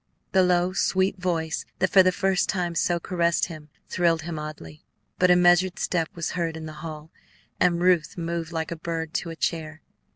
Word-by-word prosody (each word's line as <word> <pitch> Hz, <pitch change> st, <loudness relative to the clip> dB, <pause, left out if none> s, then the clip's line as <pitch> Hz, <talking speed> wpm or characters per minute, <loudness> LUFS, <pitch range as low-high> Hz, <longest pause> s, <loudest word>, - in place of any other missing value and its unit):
The 190 Hz, -, +4 dB
low, 180 Hz, 0 st, +2 dB
sweet 190 Hz, 0 st, +1 dB
voice 165 Hz, -3 st, -1 dB
that 185 Hz, +1 st, +1 dB
for 195 Hz, -, +8 dB
the 185 Hz, 0 st, +4 dB
first 195 Hz, 0 st, 0 dB
time 180 Hz, -3 st, -1 dB
so 170 Hz, +1 st, +1 dB
caressed 170 Hz, -1 st, +1 dB
him 155 Hz, -2 st, -10 dB, 0.2 s
thrilled 170 Hz, -3 st, +1 dB
him 165 Hz, -1 st, -5 dB
oddly; 150 Hz, -, -9 dB, 0.4 s
but 180 Hz, -, +4 dB
a 180 Hz, -, +7 dB
measured 180 Hz, +1 st, +4 dB
step 165 Hz, -3 st, -1 dB
was 170 Hz, -2 st, -3 dB
heard 165 Hz, -2 st, -2 dB
in 160 Hz, -, -7 dB
the 155 Hz, -, -7 dB
hall, 155 Hz, -1 st, -8 dB, 0.5 s
and 175 Hz, -1 st, +3 dB
Ruth 180 Hz, -3 st, +2 dB
moved 170 Hz, 0 st, -3 dB
like 160 Hz, -1 st, -3 dB
a -, -, -2 dB
bird 165 Hz, 0 st, -4 dB
to 170 Hz, -, -2 dB
a 165 Hz, -, -6 dB
chair. 155 Hz, -1 st, -3 dB
170 Hz, 195 wpm, -25 LUFS, 160-180 Hz, 0.5 s, for